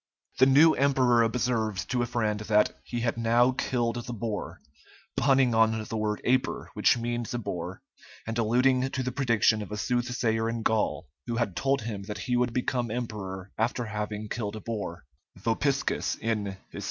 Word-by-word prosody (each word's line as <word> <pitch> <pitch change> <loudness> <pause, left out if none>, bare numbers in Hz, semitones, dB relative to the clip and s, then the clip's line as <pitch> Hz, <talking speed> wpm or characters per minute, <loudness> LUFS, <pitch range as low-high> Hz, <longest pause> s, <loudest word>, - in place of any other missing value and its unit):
The 130 - +7
new 150 +4 +7
emperor 130 -3 +3
observed 115 -4 0
to 125 -2 +1
a 120 - 0
friend 110 -3 -1
that 105 0 +2
"he 120 -1 -4
had 115 -1 0
now 120 +2 +4
killed 120 -2 -1
the 120 - -4
boar," 110 -2 -4 0.6
punning 135 -3 +3
on 110 0 +3
the 110 - -6
word 105 -1 -1
Aper, 130 +1 0
which - - +3
means 120 0 -3
a - - 0
boar, 90 -4 -5 0.4
and 115 - -4
alluding 125 +3 +2
to 130 -1 -2
the 125 - -2
prediction 115 -4 +2
of 105 - -7
a 105 - -3
soothsayer 120 -1 0
in 115 -1 -3
Gaul, 110 -1 0 0.2
who 120 - -2
had 110 -6 -1
told 135 -3 +1
him 105 -3 -4
that 105 0 -5
he 125 +5 -1
would 125 0 +2
become 125 -1 -1
emperor 105 -5 -5
after 120 +2 0
having 105 0 -4
killed 105 -2 -3
a - - -5
boar 105 -6 -5 0.3
(Vopiscus, 130 +7 0
in 105 -4 -2
"Hist. - - -7
115 Hz, 180 wpm, -28 LUFS, 110-125 Hz, 0.6 s, The